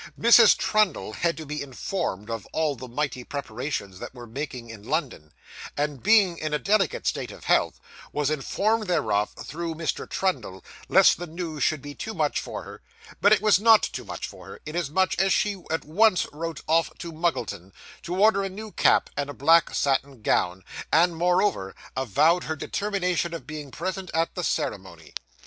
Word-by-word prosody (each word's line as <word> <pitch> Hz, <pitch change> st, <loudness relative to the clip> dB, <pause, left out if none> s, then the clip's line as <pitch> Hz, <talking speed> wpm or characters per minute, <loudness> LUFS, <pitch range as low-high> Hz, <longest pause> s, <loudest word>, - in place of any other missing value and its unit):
Mrs. 230 Hz, -1 st, +7 dB
Trundle 210 Hz, -, +1 dB
had 165 Hz, +5 st, 0 dB
to 160 Hz, -, -7 dB
be 150 Hz, +1 st, -4 dB
informed 130 Hz, -, -4 dB
of 115 Hz, -3 st, -5 dB
all 155 Hz, -3 st, 0 dB
the 130 Hz, +1 st, -9 dB
mighty 130 Hz, 0 st, -3 dB
preparations 120 Hz, -7 st, -5 dB
that -, -, -8 dB
were 120 Hz, -1 st, -9 dB
making 120 Hz, -1 st, -6 dB
in 110 Hz, -3 st, -10 dB
London; 125 Hz, -, -3 dB, 0.5 s
and, 145 Hz, -2 st, -2 dB
being 200 Hz, -5 st, +4 dB
in 155 Hz, -1 st, -1 dB
a -, -, +2 dB
delicate 195 Hz, 0 st, +1 dB
state -, -, -1 dB
of -, -, -12 dB
health, -, -, +2 dB, 0.3 s
was 150 Hz, 0 st, 0 dB
informed 215 Hz, +9 st, 0 dB
thereof 110 Hz, -, +1 dB
through 165 Hz, +1 st, -5 dB
Mr. 160 Hz, 0 st, -3 dB
Trundle, 125 Hz, -, -2 dB, 0.2 s
lest -, -, +6 dB
the 175 Hz, -, -6 dB
news 160 Hz, -2 st, -5 dB
should 155 Hz, -1 st, +1 dB
be 145 Hz, 0 st, -7 dB
too 220 Hz, +8 st, -6 dB
much 155 Hz, -3 st, 0 dB
for -, -, -6 dB
her; -, -, -11 dB, 0.4 s
but 205 Hz, -, +5 dB
it 215 Hz, -, +5 dB
was 215 Hz, -3 st, +5 dB
not 225 Hz, 0 st, +6 dB
too -, -, -3 dB
much -, -, -6 dB
for 95 Hz, 0 st, -13 dB
her, 95 Hz, -, -10 dB
inasmuch 175 Hz, +4 st, 0 dB
as 190 Hz, 0 st, +3 dB
she 200 Hz, -1 st, +1 dB
at 160 Hz, +1 st, -2 dB
once 185 Hz, +5 st, +3 dB
wrote 165 Hz, 0 st, -5 dB
off 165 Hz, +1 st, +3 dB
to 170 Hz, -, -7 dB
Muggleton, 155 Hz, -, -2 dB, 0.3 s
to 175 Hz, -, -4 dB
order 210 Hz, -1 st, +5 dB
a 195 Hz, -, -2 dB
new 210 Hz, +3 st, -8 dB
cap -, -, +3 dB
and 145 Hz, 0 st, -2 dB
a 145 Hz, -, -7 dB
black 165 Hz, +5 st, +4 dB
satin 135 Hz, -3 st, 0 dB
gown, 90 Hz, -1 st, +1 dB, 0.3 s
and 170 Hz, +2 st, +4 dB
moreover 175 Hz, -, +1 dB, 0.2 s
avowed 155 Hz, -, +2 dB
her 160 Hz, -, -2 dB
determination 180 Hz, -1 st, -1 dB
of 165 Hz, -, -8 dB
being 150 Hz, -2 st, -7 dB
present 185 Hz, +5 st, -4 dB
at 165 Hz, 0 st, +1 dB
the 180 Hz, -, -4 dB
ceremony. 95 Hz, -, -3 dB
160 Hz, 180 wpm, -25 LUFS, 135-185 Hz, 0.5 s, Mrs